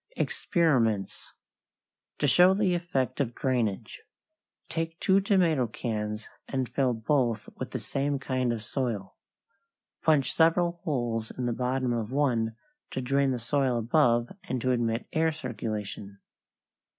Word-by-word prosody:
=EXPERIMENTS= 125 - 0 0.8
=To - - 0
show 180 +2 +6
the 195 -3 +2
Effect 170 -9 -1
of 120 -4 -1
Drainage.= 115 -5 -1 0.7
Take 165 0 -3
two 195 +1 +4
tomato 170 - +3
cans 105 -1 -4 0.2
and 130 -2 -1
fill 125 0 +1
both 115 -2 0
with - - -4
the - - -4
same 140 +1 -1
kind 130 -2 -1
of 115 -2 -3
soil. 110 -5 -3 0.9
Punch 150 -5 +3
several 170 +1 +3
holes 120 -6 -1
in 125 - -2
the 120 - 0
bottom 125 +1 0
of 115 -1 -2
one 120 -6 +1 0.3
to - - -4
drain 135 +2 +2
the 130 - 0
soil 125 +1 0
above 120 -1 +3 0.2
and 130 - -2
to 130 - +1
admit 120 -1 0
air 160 0 +2
circulation. 105 -7 -5
130 Hz, 135 wpm, -28 LUFS, 115-150 Hz, 0.9 s, show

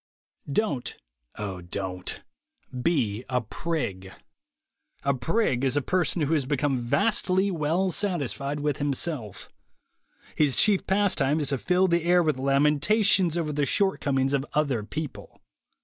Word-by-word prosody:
Don't, 140 - -1 0.4
(O 100 -4 -5
Don't) 90 +1 -5 0.6
be 125 -9 0
a 125 -1 +1
prig. 105 - -4 0.9
A 140 - +2
prig 135 - 0
is 135 +1 +2
a - - +2
person 175 -1 0
who 145 +3 0
has 140 -5 0
become 140 -2 0
vastly 185 - +1
well 170 +3 0
satisfied 150 - -1
with 145 -2 -1
himself. 135 - -2 0.8
His 145 -4 +2
chief 205 -3 +3
pastime 185 -7 +2
is 145 - -1
to 135 -2 -1
fill 180 +5 +2
the 170 -1 +1
air 175 +1 +4
with 155 -5 0
lamentations 150 +7 +3
over 155 -3 -2
the 145 -1 0
shortcomings 140 -7 +1
of 135 -1 +1
other 140 -7 +1
people. 150 +7 -7
145 Hz, 135 wpm, -26 LUFS, 130-175 Hz, 0.9 s, air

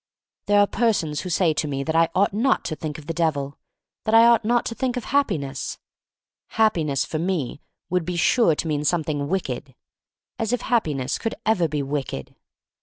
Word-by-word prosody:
There 205 0 +4
are 205 - +6
persons 200 -10 0
who 185 - -6
say 170 -2 +2
to 150 - -1
me 140 -1 -2
that 160 +2 -2
I 165 0 +4
ought 195 +2 +3
not 240 +6 +1
to 155 - -2
think 155 -1 -5
of 155 - -11
the 165 - -3
Devil, 150 -5 0
• - - -26 0.5
that 220 - +2
I 230 +1 +8
ought 235 -1 +5
not 240 +2 +2
to - - -3
think 255 +1 -2
of 245 - -4
Happi 275 - +1
ness 135 -1 -5 0.4
— - - -70
Happiness 155 -11 +2
for 155 - -3
me 165 -6 -2 0.3
would 180 -1 +1
be 175 +2 -3
sure 170 +1 +3
to 165 - -3
mean 150 -2 -1
something 150 -3 0
wicked 135 -7 -3 0.6
(as 225 +1 -1
if 245 - 0
Hap 235 -1 +1
piness 135 -4 -2
could 225 - -3
ever 200 -6 +2
be 145 -2 -2
wicked!) 135 - -4
165 Hz, 210 wpm, -23 LUFS, 145-220 Hz, 0.6 s, I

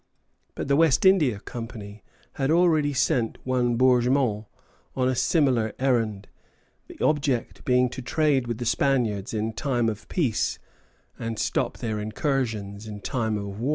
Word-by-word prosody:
But - - -4
the 140 - +3
West 160 0 +3
India 155 - +4
Company 110 -2 -8 0.3
had 135 0 -1
already 160 -3 +3
sent 125 -4 0
one 125 -2 +1
Bourgmont 125 -3 +2 0.5
on 130 -1 +1
a 130 - +2
similar 125 - +2
errand, 115 -6 0 0.6
the - - -12
object 140 -5 0
being 125 0 +3
to 130 - -7
trade 135 -1 +1
with 120 -2 -3
the 120 - -4
Spaniards 120 - 0
in 110 0 -2
time 120 -1 0
of 110 -1 -7
peace, 135 - 0 0.6
and 115 -1 -4
stop - - -1
their 110 -2 -3
incursions 110 -3 -2
in 105 -1 -8
time 110 -2 -1
of 100 0 -6
war. 125 +5 -1
120 Hz, 150 wpm, -25 LUFS, 110-135 Hz, 0.6 s, India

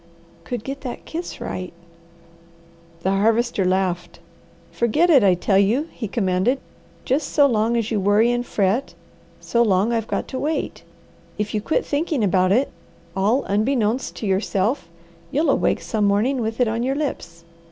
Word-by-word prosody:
"Could 245 -3 -4
get 275 +1 -6
that 250 -3 -7
kiss 340 +2 -6
right 185 0 -5 0.7
" 170 0 -28
The 190 - +1
Harvester 220 +2 +2
laughed. 180 -2 -1 0.5
"Forget 300 +10 +2
it, 275 -7 +6
I 190 -2 +5
tell 190 +2 +2
you!" 240 +11 +2
he 225 - -5
commanded. 195 +4 +1 0.5
"Just 275 +3 0
so 290 - +5
long 230 -2 +2
as 230 0 -1
you 215 - +1
worry 205 +4 +3
and 240 0 0
fret, 210 +3 0 0.4
so 235 - 0
long 210 0 +2
I've 225 -1 -1
got - - -2
to 260 - -4
wait. 310 +2 -2 0.6
If 210 0 -3
you 210 - 0
quit 270 - 0
thinking 295 -4 -1
about 185 -1 +3
it, 255 +7 +2 0.4
all 210 +8 +2
'unbeknownst' 220 +3 0
to - - -5
yourself 195 +2 0 0.4
you'll 295 - +2
awake - - +1
some 215 -2 -1
morning 225 +6 +2
with 225 +1 -3
it 250 - +3
on 225 +1 -1
your 265 +3 0
lips. 170 - -4
220 Hz, 165 wpm, -22 LUFS, 195-255 Hz, 0.7 s, it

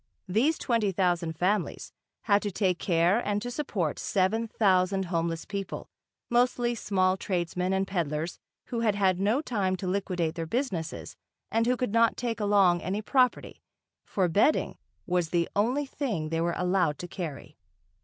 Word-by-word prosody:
These 240 - +2
twenty 230 -5 +1
thousand 175 -3 0
families 185 +2 -1 0.3
had 205 -1 +3
to 205 - -2
take 185 -2 0
care 175 +4 +3
and 205 -3 -1
to 245 - -4
support 205 - -2
seven 215 +4 +1
thousand 190 -3 +2
homeless 165 -2 -2
people, 200 -1 -5 0.4
mostly 240 0 +2
small 190 -4 +1
tradesmen 180 -1 -2
and 190 0 +1
peddlers 165 -3 -2 0.3
who 235 - -2
had 220 -3 +2
had 190 -3 +2
no 215 +8 +2
time 200 -8 0
to 185 - -6
liquidate 180 -3 -1
their 165 -1 -4
businesses 190 - -3 0.4
and 230 +1 +2
who 250 0 +2
could 250 -5 -2
not 230 0 +4
take 235 -2 -2
along 200 -4 +4
any 200 +4 -3
property, 255 +2 +1 0.4
for 190 -3 0
bedding 205 - +2 0.3
was 180 -2 0
the 170 0 +1
only 250 +8 +1
thing 225 - -3
they 165 0 -1
were 170 0 0
allowed 180 -5 +1
to 175 - -6
carry. 160 -8 -7
190 Hz, 160 wpm, -28 LUFS, 175-225 Hz, 0.4 s, not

